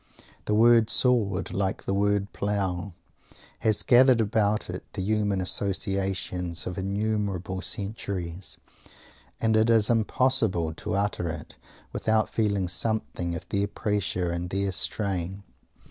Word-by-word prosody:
The 105 Hz, -, +1 dB
word 115 Hz, 0 st, +5 dB
"Sword" 105 Hz, -8 st, +3 dB
like 95 Hz, 0 st, -1 dB
the 95 Hz, -, -2 dB
word 100 Hz, 0 st, 0 dB
"Plough," 100 Hz, -2 st, -2 dB, 0.7 s
has 110 Hz, -2 st, +3 dB
gathered 125 Hz, 0 st, +6 dB
about 105 Hz, -1 st, +1 dB
it -, -, -6 dB
the 95 Hz, -, -3 dB
human 105 Hz, -1 st, 0 dB
associations 95 Hz, -2 st, -2 dB
of 90 Hz, +1 st, -4 dB
innumerable 100 Hz, -2 st, -2 dB
centuries, 95 Hz, -3 st, -4 dB, 0.8 s
and 110 Hz, -1 st, +2 dB
it 110 Hz, +1 st, +3 dB
is 115 Hz, -1 st, +4 dB
impossible 110 Hz, -7 st, +1 dB
to 80 Hz, -, -4 dB
utter 100 Hz, -4 st, -1 dB
it -, -, -7 dB, 0.4 s
without 110 Hz, 0 st, +1 dB
feeling 100 Hz, -4 st, 0 dB
something 90 Hz, -2 st, -1 dB
of 85 Hz, -, -8 dB
their 100 Hz, 0 st, 0 dB
pressure 100 Hz, -4 st, -1 dB
and 85 Hz, +1 st, -3 dB
their 100 Hz, +1 st, -1 dB
strain. 95 Hz, 0 st, -1 dB
100 Hz, 125 wpm, -26 LUFS, 95-110 Hz, 0.8 s, gathered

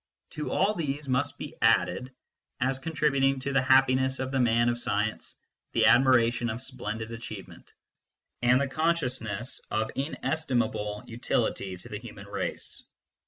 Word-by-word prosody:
To 150 Hz, -, -4 dB
all 195 Hz, +3 st, +2 dB
these 150 Hz, -5 st, -3 dB
must 130 Hz, +2 st, 0 dB
be -, -, -7 dB
added, 130 Hz, +1 st, +2 dB, 0.5 s
as 130 Hz, +2 st, 0 dB
contributing 140 Hz, -3 st, +1 dB
to 140 Hz, +1 st, -2 dB
the 135 Hz, -, +4 dB
happiness 130 Hz, 0 st, +4 dB
of 130 Hz, 0 st, -3 dB
the 135 Hz, -, 0 dB
man 120 Hz, -1 st, +3 dB
of 120 Hz, 0 st, +1 dB
science, 105 Hz, -1 st, -1 dB, 0.4 s
the -, -, +3 dB
admiration 120 Hz, -2 st, +4 dB
of 110 Hz, +2 st, -3 dB
splendid 115 Hz, -4 st, -5 dB
achievement, 115 Hz, -3 st, -9 dB, 0.7 s
and 125 Hz, +1 st, +5 dB
the 140 Hz, -, +1 dB
consciousness 130 Hz, -8 st, -1 dB
of 110 Hz, +1 st, 0 dB
inestim 135 Hz, -3 st, 0 dB
able 105 Hz, -1 st, -5 dB
utility 115 Hz, -5 st, -1 dB
to -, -, -12 dB
the -, -, -5 dB
human -, -, -10 dB
race. -, -, -5 dB
130 Hz, 145 wpm, -28 LUFS, 115-135 Hz, 0.7 s, and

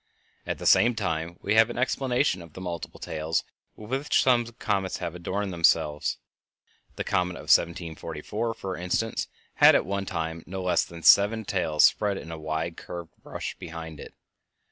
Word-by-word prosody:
At -, -, -2 dB
the -, -, -8 dB
same 120 Hz, +1 st, +5 dB
time 85 Hz, -5 st, -2 dB
we 105 Hz, -, +1 dB
have 110 Hz, +1 st, +6 dB
an 120 Hz, -, -6 dB
explanation 125 Hz, -4 st, +1 dB
of 85 Hz, -2 st, -13 dB
the -, -, -9 dB
multiple 85 Hz, -3 st, -6 dB
tails 80 Hz, +1 st, -2 dB, 0.3 s
with 105 Hz, +2 st, -11 dB
which 135 Hz, +3 st, +2 dB
some 120 Hz, -3 st, +3 dB
comets 100 Hz, -5 st, -1 dB
have 85 Hz, -, -4 dB
adorned 95 Hz, +3 st, -3 dB
themselves. 80 Hz, -3 st, +2 dB, 0.8 s
The -, -, -3 dB
comet 90 Hz, 0 st, 0 dB
of -, -, +3 dB
1744, 85 Hz, +6 st, -3 dB
for 95 Hz, -4 st, -5 dB
instance, 90 Hz, +6 st, -1 dB, 0.3 s
had -, -, +8 dB
at -, -, +2 dB
one 100 Hz, +1 st, -3 dB
time 80 Hz, -1 st, -3 dB
no 95 Hz, 0 st, -5 dB
less 90 Hz, -, +2 dB
than 85 Hz, -1 st, -11 dB
seven 105 Hz, +2 st, +6 dB
tails 80 Hz, -6 st, +1 dB
spread 100 Hz, -2 st, +3 dB
in 85 Hz, -, -8 dB
a 80 Hz, -, -6 dB
wide 80 Hz, +2 st, -3 dB
curved 85 Hz, -2 st, -8 dB
brush -, -, -6 dB
behind 80 Hz, -2 st, -8 dB
it. -, -, -11 dB
90 Hz, 170 wpm, -26 LUFS, 80-105 Hz, 0.8 s, had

